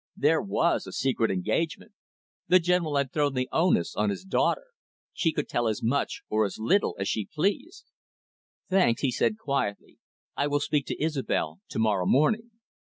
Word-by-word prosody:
There -, -, +3 dB
was -, -, 0 dB
a -, -, -7 dB
secret 125 Hz, -4 st, 0 dB
engagement. 110 Hz, -, -2 dB, 0.6 s
The 180 Hz, -, +6 dB
General 175 Hz, -3 st, +1 dB
had 140 Hz, -2 st, 0 dB
thrown 145 Hz, -3 st, +1 dB
the 130 Hz, 0 st, 0 dB
onus 160 Hz, -, +2 dB
on 105 Hz, 0 st, +1 dB
his 100 Hz, -, -4 dB
daughter. 190 Hz, -, +1 dB, 0.5 s
She 165 Hz, -, +1 dB
could 150 Hz, -1 st, -3 dB
tell 120 Hz, -1 st, 0 dB
as 110 Hz, 0 st, -2 dB
much 125 Hz, +5 st, -1 dB
or 110 Hz, 0 st, +1 dB
as 100 Hz, -, -3 dB
little 185 Hz, -, +1 dB
as 95 Hz, -, -2 dB
she 105 Hz, -3 st, -1 dB
pleased. 205 Hz, -, -2 dB, 0.8 s
"Thanks," 185 Hz, -11 st, +2 dB
he 135 Hz, -, +2 dB
said 210 Hz, -, 0 dB
quietly. 140 Hz, -, -3 dB, 0.4 s
"I 140 Hz, -, 0 dB
will 145 Hz, 0 st, +1 dB
speak 145 Hz, -1 st, -1 dB
to -, -, -4 dB
Isobel 135 Hz, -, -1 dB
to -, -, -6 dB
morrow 105 Hz, -5 st, +1 dB
morning." 215 Hz, -, +2 dB
140 Hz, 170 wpm, -27 LUFS, 110-165 Hz, 0.8 s, The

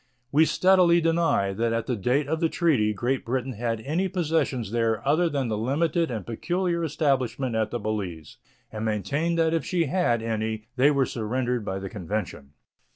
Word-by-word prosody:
We 155 Hz, +3 st, +5 dB
steadily 180 Hz, -1 st, +4 dB
deny 165 Hz, -12 st, +1 dB
that 115 Hz, +3 st, 0 dB
at 115 Hz, 0 st, -1 dB
the 125 Hz, -, -1 dB
date 125 Hz, +7 st, 0 dB
of 160 Hz, +2 st, -1 dB
the 165 Hz, -, +2 dB
treaty 140 Hz, -13 st, +2 dB
Great 120 Hz, +6 st, -1 dB
Britain 130 Hz, +2 st, -2 dB
had 115 Hz, 0 st, -2 dB
any 160 Hz, +9 st, -1 dB
possessions 160 Hz, -, -1 dB
there 115 Hz, 0 st, 0 dB
other 165 Hz, +4 st, +3 dB
than 140 Hz, -4 st, -1 dB
the 110 Hz, -2 st, -2 dB
limited 160 Hz, +7 st, 0 dB
and 110 Hz, -7 st, -4 dB
peculiar 175 Hz, +8 st, -1 dB
establishment 135 Hz, -5 st, 0 dB
at 110 Hz, -1 st, 0 dB
the 120 Hz, -, -3 dB
Balize, 95 Hz, -8 st, -4 dB, 0.3 s
and 110 Hz, 0 st, -5 dB
maintain 140 Hz, -, -1 dB
that 165 Hz, -1 st, +2 dB
if 165 Hz, -, 0 dB
she 175 Hz, -2 st, 0 dB
had 135 Hz, -8 st, +1 dB
any 110 Hz, -1 st, -2 dB
they 135 Hz, +3 st, +5 dB
were 140 Hz, -2 st, +2 dB
surrendered 120 Hz, +1 st, -2 dB
by 95 Hz, -2 st, -3 dB
the 95 Hz, 0 st, -5 dB
convention. 90 Hz, -8 st, -5 dB
125 Hz, 180 wpm, -25 LUFS, 110-160 Hz, 0.3 s, We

